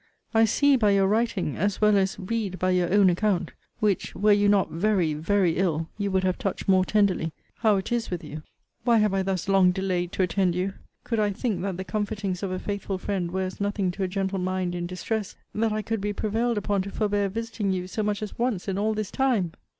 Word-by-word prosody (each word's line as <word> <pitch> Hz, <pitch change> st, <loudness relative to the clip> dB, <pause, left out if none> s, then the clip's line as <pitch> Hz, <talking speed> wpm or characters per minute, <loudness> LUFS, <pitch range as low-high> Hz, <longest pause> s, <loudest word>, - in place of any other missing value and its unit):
I 225 Hz, 0 st, +5 dB
see 280 Hz, +5 st, +4 dB
by 215 Hz, -4 st, +3 dB
your 195 Hz, -1 st, +4 dB
writing, 215 Hz, -6 st, 0 dB
as 205 Hz, +2 st, 0 dB
well 210 Hz, -1 st, +4 dB
as 195 Hz, -1 st, +1 dB
read 200 Hz, -1 st, -2 dB
by 185 Hz, +1 st, +1 dB
your 180 Hz, -1 st, +1 dB
own 200 Hz, -1 st, +5 dB
account, 185 Hz, +1 st, +1 dB, 0.3 s
(which, 205 Hz, -3 st, 0 dB
were 210 Hz, +3 st, +3 dB
you 205 Hz, 0 st, +4 dB
not 200 Hz, -2 st, +3 dB
very, 175 Hz, -2 st, +1 dB
very 170 Hz, +2 st, +1 dB
ill, 165 Hz, -3 st, 0 dB
you 200 Hz, -1 st, -2 dB
would 190 Hz, -1 st, +1 dB
have 185 Hz, -1 st, 0 dB
touched 195 Hz, -, -3 dB
more 190 Hz, -1 st, +5 dB
tenderly,) 185 Hz, -6 st, +1 dB, 0.2 s
how 215 Hz, -2 st, +3 dB
it 190 Hz, +3 st, -3 dB
is 240 Hz, -1 st, 0 dB
with 180 Hz, -2 st, -4 dB
you! 150 Hz, 0 st, -7 dB, 0.4 s
Why 235 Hz, -1 st, +4 dB
have 210 Hz, -2 st, +2 dB
I 195 Hz, -, +1 dB
thus 190 Hz, -2 st, -2 dB
long 195 Hz, -2 st, +5 dB
delayed 180 Hz, -1 st, -1 dB
to 190 Hz, -, +1 dB
attend 180 Hz, 0 st, +1 dB
you! 185 Hz, +2 st, -1 dB, 0.3 s
Could 230 Hz, -2 st, -1 dB
I 210 Hz, -1 st, +2 dB
think, 205 Hz, +1 st, -2 dB
that 190 Hz, -2 st, -3 dB
the 190 Hz, -, -4 dB
comfortings 205 Hz, -3 st, -2 dB
of 195 Hz, -, -2 dB
a 185 Hz, -, -2 dB
faithful 200 Hz, 0 st, -3 dB
friend 185 Hz, -2 st, -2 dB
were 190 Hz, +2 st, -2 dB
as 185 Hz, +2 st, -5 dB
nothing 200 Hz, -2 st, 0 dB
to 195 Hz, -, -7 dB
a -, -, +1 dB
gentle 195 Hz, +1 st, -2 dB
mind 185 Hz, -1 st, -1 dB
in 175 Hz, 0 st, -3 dB
distress, 205 Hz, +3 st, -3 dB, 0.2 s
that 220 Hz, +1 st, +1 dB
I 215 Hz, 0 st, -2 dB
could 225 Hz, -1 st, -2 dB
be 205 Hz, +1 st, -1 dB
prevailed 225 Hz, +3 st, 0 dB
upon 205 Hz, -1 st, 0 dB
to 195 Hz, -, -5 dB
forbear 205 Hz, -1 st, 0 dB
visiting 225 Hz, -1 st, -2 dB
you 180 Hz, -1 st, -2 dB
so 185 Hz, +4 st, -3 dB
much 210 Hz, 0 st, -1 dB
as 210 Hz, -, -7 dB
once 235 Hz, -7 st, -1 dB
in 195 Hz, 0 st, -1 dB
all 215 Hz, +1 st, +1 dB
this 215 Hz, -2 st, -3 dB
time! 235 Hz, -11 st, +1 dB
195 Hz, 235 wpm, -26 LUFS, 185-210 Hz, 0.4 s, I